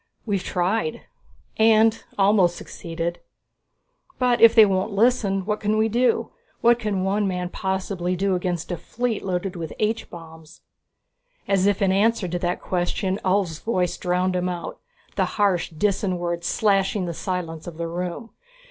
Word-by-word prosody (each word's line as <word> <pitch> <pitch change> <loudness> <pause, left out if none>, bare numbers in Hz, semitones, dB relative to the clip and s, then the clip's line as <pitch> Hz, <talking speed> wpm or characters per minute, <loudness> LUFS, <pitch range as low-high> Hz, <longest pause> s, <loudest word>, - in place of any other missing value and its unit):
"We've 200 -4 0
tried 225 +6 -1 0.6
and 220 0 +4
almost 195 -3 +4
succeeded. 170 0 -5 1.0
But 250 -2 +2
if 230 0 +8
they 220 - +9
won't 190 +1 0
listen, 200 -3 +2
what 210 0 -1
can 215 0 0
we 220 +1 +2
do? 245 +3 +1 0.3
What 235 0 +4
can 205 -5 -1
one 200 +2 +1
man 180 -1 -2
possibly 190 -2 -2
do 195 +1 0
against 180 -1 -2
a 175 - -2
fleet 235 +6 -3
loaded 185 0 -2
with 165 -3 -5
H 220 +1 -1
bombs?" 160 -1 -12 0.9
As 195 -1 +2
if 205 0 +1
in 190 - +3
answer 205 0 +2
to 175 +1 -3
the 175 0 0
question, 185 +2 -2
Ulv's 185 -4 0
voice 185 -6 -1
drowned 180 +1 0
him 180 0 0
out, 175 -1 -5 0.4
the - - +3
harsh 195 -5 +1
Disan 190 +2 0
words 170 0 -3
slashing 195 -2 +1
the 170 - -3
silence 165 -2 -4
of 165 -2 -8
the 170 0 -3
room. 180 +6 -5
190 Hz, 155 wpm, -23 LUFS, 175-210 Hz, 1.0 s, they